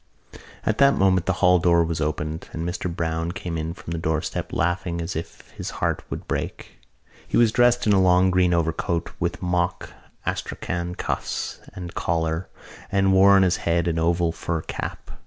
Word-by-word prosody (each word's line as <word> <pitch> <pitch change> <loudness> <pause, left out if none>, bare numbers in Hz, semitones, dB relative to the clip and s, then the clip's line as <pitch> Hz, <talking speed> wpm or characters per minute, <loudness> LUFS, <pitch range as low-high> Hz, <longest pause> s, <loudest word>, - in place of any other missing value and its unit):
At 110 - 0
that 140 0 +6
moment 95 -2 +3
the - - +3
hall 90 0 +6
door 85 -1 +4
was 80 -1 -2
opened 75 +1 -3
and 80 +1 -3
Mr 90 0 -3
Browne 80 0 -2
came 85 -2 -5
in 80 +1 -3
from 85 - -9
the 85 - -2
doorstep, 80 -1 -2
laughing 85 +1 -1
as 85 +2 -4
if 80 - -7
his - - -6
heart - - 0
would - - -6
break. - - -4 0.5
He - - 0
was 115 -2 +5
dressed 120 +1 +3
in 105 - +4
a 95 - +5
long 95 0 +4
green 90 -1 +3
overcoat 85 0 0
with - - -2
mock 90 0 -1 0.3
astrakhan 90 0 -3
cuffs - - -3 0.2
and 90 -2 -7
collar 80 +1 -1 0.4
and 95 -1 +3
wore 95 +1 +7
on 95 - +6
his 90 -1 +2
head 85 +1 0
an 80 -1 0
oval 85 0 +2
fur 85 0 -3
cap. - - -6
85 Hz, 180 wpm, -24 LUFS, 80-95 Hz, 0.5 s, wore